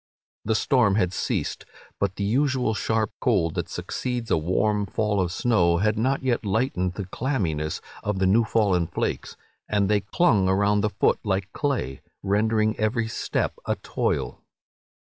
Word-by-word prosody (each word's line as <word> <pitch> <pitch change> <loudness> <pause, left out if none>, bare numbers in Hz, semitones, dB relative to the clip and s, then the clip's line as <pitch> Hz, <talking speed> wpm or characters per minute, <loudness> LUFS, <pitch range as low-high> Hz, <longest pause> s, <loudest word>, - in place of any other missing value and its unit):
The 110 +1 +1
storm 115 -5 +3
had 95 -4 +1
ceased, - - -2 0.4
but 100 -1 0
the 100 - -3
usual 130 +2 +1
sharp 110 0 0
cold 95 - +2
that - - -3
succeeds 125 -2 -4
a - - +5
warm 100 +5 +1
fall 105 0 0
of 90 -2 -1
snow 90 -5 +2
had 110 +4 +1
not 130 +5 0
yet 125 -3 0
lightened 100 -4 0
the 100 - -4
clamminess 90 - -2 0.2
of 105 -1 -2
the 95 - +1
new 105 +5 +4
fallen 100 -7 +1
flakes, - - -3 0.3
and 100 -2 +1
they 105 - +4
clung 100 - +2
around 100 +2 +2
the 105 - +1
foot 100 - +1
like 100 -1 -2
clay, 135 - -2 0.2
rendering 110 +2 +2
every 110 +1 0
step 115 - -2
a - - +1
toil." - - -2
105 Hz, 160 wpm, -25 LUFS, 95-115 Hz, 0.4 s, a